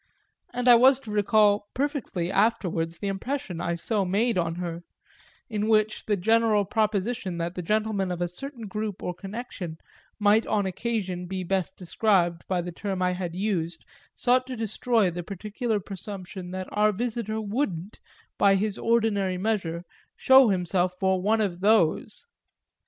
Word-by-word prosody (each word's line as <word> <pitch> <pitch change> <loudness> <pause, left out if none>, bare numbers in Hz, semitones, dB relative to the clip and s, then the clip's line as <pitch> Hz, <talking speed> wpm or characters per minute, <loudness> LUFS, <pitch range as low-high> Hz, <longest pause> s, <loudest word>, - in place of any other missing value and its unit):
And 245 0 -2
I 245 - +10
was 260 +3 +6
to 220 - -8
recall 205 0 +3
perfectly 260 - -2
afterwards 185 -6 +1
the 200 - -4
impression 195 -3 -3
I 170 0 -1
so 205 +4 0
made 210 +5 +1
on 165 -2 0
her 170 -1 -4 0.7
in 215 -4 -2
which 215 -1 +2
the 205 -2 +1
general 220 +1 +3
proposition 210 -2 -1
that 170 +1 -3
the 180 - -4
gentlemen 210 0 0
of 175 - -3
a 175 - 0
certain 235 - -7
group 210 0 -4
or 180 - -2
connection 195 -4 -7 0.4
might 210 +1 +3
on 205 -2 +1
occasion 190 -2 -3
be 185 0 -3
best 190 0 -2
described 175 -2 +1
by 180 -2 0
the 175 - -5
term 190 +2 -4
I 180 - +2
had 180 -2 -4
used 175 -5 -2 0.3
sought 255 +1 +2
to 260 - -5
destroy 220 -2 +1
the 175 +1 -4
particular 210 +4 -3
presumption 190 -1 -8
that 185 0 -5
our 210 +1 +3
visitor 220 0 -3
wouldn't, 205 - -3 0.4
by 200 -1 +5
his 205 +1 -1
ordinary 210 -5 +1
measure, 180 -5 -1 0.3
show 265 -2 +6
himself 180 -1 +1
for 190 -1 +1
one 220 +3 +2
of 185 -4 -1
those. 200 - +2
200 Hz, 155 wpm, -26 LUFS, 180-220 Hz, 0.7 s, I